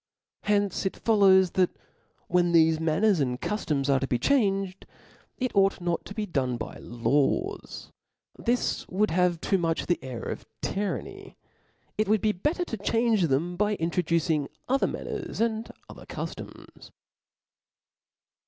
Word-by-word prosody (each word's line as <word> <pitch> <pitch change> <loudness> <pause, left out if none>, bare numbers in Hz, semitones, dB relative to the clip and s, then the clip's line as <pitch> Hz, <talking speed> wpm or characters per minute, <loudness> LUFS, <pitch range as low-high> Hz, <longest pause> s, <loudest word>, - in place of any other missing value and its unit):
From 210 - +1
hence 205 -2 +1
it - - -5
follows 190 -5 +5
that 185 -2 +3 0.6
when 175 -1 +2
tbelb 160 -1 +5
manners 165 +5 +2
and 125 -3 0
cuftoms 150 -10 -1
are 135 -1 +3
to 135 - -2
be 125 - +1
changed, 195 - +1 0.5
it 255 -3 -2
ought 195 0 +3
not 175 -1 -2
to 200 - -9
be 215 - -2
done 130 -9 -1
by 110 - -7
laws; 140 - -1 0.4
this 245 +1 -1
would 210 +4 +1
have 180 0 +2
too 195 - +1
nrruch 165 -1 0
the 175 -6 0
air 130 -3 -6
of - - -5 0.2
tyranny: 200 0 -4 0.6
it 215 - +2
wojjld 215 -1 +3
be 215 - +3
better 300 - -1
to 225 - -5
change 225 -2 +2
them 160 +6 0
by 210 +3 +1
introducing 165 -4 0 0.2
other 270 +2 +2
manners - - -5
and 225 0 -1 0.2
other - - -12
cuftoms. - - -8
185 Hz, 145 wpm, -27 LUFS, 160-210 Hz, 0.6 s, follows